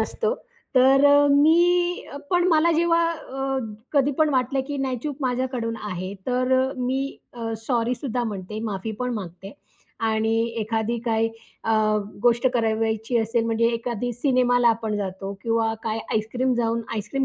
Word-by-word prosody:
नसतो. 455 +1 -1 0.4
तर 265 +2 +6
अ, 285 0 +6
मी 345 +4 +4 0.3
पण 355 0 +3
मला 330 +1 +4
जेव्हा 335 +1 +3
अ, 270 -4 -3 0.3
कधी 285 0 +3
पण 310 - +4
वाटलं 265 +1 +1
की 290 - -3
नाही 265 -2 -1
चूक 295 -3 -3
माझ्याकडून 250 -3 -1
आहे. 185 +1 -4
तर 255 +1 +1
अ, 265 +1 0
मी 260 +2 -2 0.2
अ, 230 -1 -4
सॉरी 240 -1 +1
सुद्धा 245 -2 -3
म्हणते, 210 -1 -5
माफी 200 +3 -4
पण 250 0 -1
मागते. 195 -1 -7 0.5
आणि 220 0 +1 0.3
एखादी 220 +2 -1
काही 225 -1 +1 0.4
अ, 225 - 0 0.5
गोष्ट 240 +1 +3
करावयाची 225 0 0
असेल, 225 +1 0
म्हणजे 230 0 +2
एखादी 240 0 -3
सिनेमाला 245 -1 +3
आपण 225 -2 0
जातो 195 -1 -4
किंवा 225 -1 +1
काय 220 0 -2
आईसक्रीम 245 +4 0
जाऊन 230 -1 0
आईसक्रीम 225 +6 -2
245 Hz, 150 wpm, -24 LUFS, 225-270 Hz, 0.5 s, तर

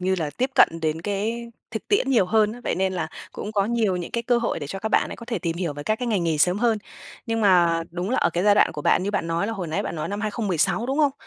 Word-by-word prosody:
như 190 +1 +1
là 155 -3 -2
tiếp 255 - -2
cận 275 - +7
đến 160 +1 -1
cái 220 +4 -2 0.2
thực 220 - -6
tiễn 405 -10 +2
nhiều 230 -8 +4
hơn 215 +1 +3
á. 245 - -10
Vậy - - 0
nên 190 +1 0
là 160 -3 -2 0.2
cũng 210 - -6
có 200 -2 +2
nhiều 220 -4 +1
những 175 -1 -5
cái 235 - -2
cơ 240 +1 +2
hội 235 - -1
để 145 - -5
cho 195 +7 -5
các 220 - -3
bạn - - +2
ấy - - -6
có 235 - -11
thể 230 -4 -2
tìm 170 -2 -3
hiểu 170 -4 -2
về 145 0 -7
các 215 +8 0
cái 250 - -3
ngành 200 -6 +1
nghề 160 -2 0
sớm 180 +5 +3
hơn. 230 -1 +2 0.5
Nhưng 225 -1 -1
mà 175 -5 +4
đúng 180 +4 -3
là 260 - +1
ở - - +2
cái 175 +2 -1
giai 205 -1 +6
đoạn - - +4
của 150 - -6
bạn - - +3
như 200 - -1
bạn 200 -5 -1
nói 165 +4 0
là 225 - -2
hồi 190 -5 -4
nãy 155 - -1
bạn - - -4
nói 155 - -3
năm 205 +1 -3
2016, 210 -1 0
đúng 270 +4 -1
hông? 290 -3 +3
200 Hz, 315 wpm, -24 LUFS, 175-230 Hz, 0.5 s, cận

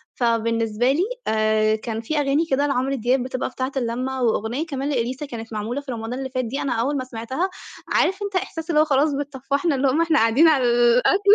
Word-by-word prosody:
فبالنسبة 230 0 +1
لي 310 +6 +1 0.2
آآ 215 0 +2
كان 220 0 -4
في 300 +7 -3
أغاني 285 +3 +1
كده 280 +2 +2
لعمرو 270 0 0
دياب 250 +1 +1
بتبقى 255 0 -3
بتاعة 260 +1 -3
اللمة، 255 +2 -2
وأغنية 235 +5 0
كمان 280 -3 -3
لإليسا 260 +1 -2
كانت 230 -4 -8
معمولة 220 +6 -3
في 280 -2 -7
رمضان 225 0 -5
اللي 265 +1 -4
فات 255 -1 -2
دي 260 +5 -3
أنا 275 - -1
أوّل 265 +6 0
ما 260 - -2
سمعتها 255 +9 -3 0.4
عارف 385 +2 +1
أنت 400 -1 -4
إحساس 325 -3 -3
اللي 305 -3 +3
هو - - +3
خلاص 285 +1 +3
بتطفحنا 280 +2 -1
اللقمة 270 +2 +1
وإحنا 330 -1 +3
قاعدين 230 +9 +5
على 295 -5 +4
الأكل 245 +12 +4
260 Hz, 200 wpm, -22 LUFS, 230-285 Hz, 0.4 s, قاعدين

